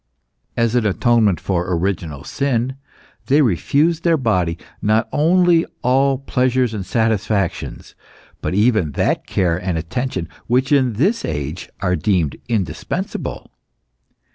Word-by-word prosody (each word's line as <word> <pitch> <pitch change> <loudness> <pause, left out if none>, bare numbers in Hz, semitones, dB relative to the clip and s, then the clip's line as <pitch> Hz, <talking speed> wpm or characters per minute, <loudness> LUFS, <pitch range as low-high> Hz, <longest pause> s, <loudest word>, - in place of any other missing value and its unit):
As 115 -1 +2
an 125 -2 +2
atonement 110 -3 +2
for 90 -1 -1
original 85 -5 -2
sin, 130 -2 -1 0.5
they 145 +2 +4
refused 145 - +1
their 170 -2 +3
body 90 - 0 0.2
not 110 +2 +2
only 170 +2 +4 0.2
all 135 +2 +3
pleasures 125 -2 0
and 105 -3 -3
satisfactions, 105 -3 -1 0.5
but - - -2
even 105 - +2
that - - 0
care 85 -3 +1
and 90 -3 -1
attention 95 +2 -3 0.2
which 130 +3 +1
in 130 -4 +3
this 190 - +1
age 75 +4 -4
are 90 -2 +1
deemed 85 -4 0
indispensable. 95 -10 -3
110 Hz, 120 wpm, -19 LUFS, 90-130 Hz, 0.5 s, they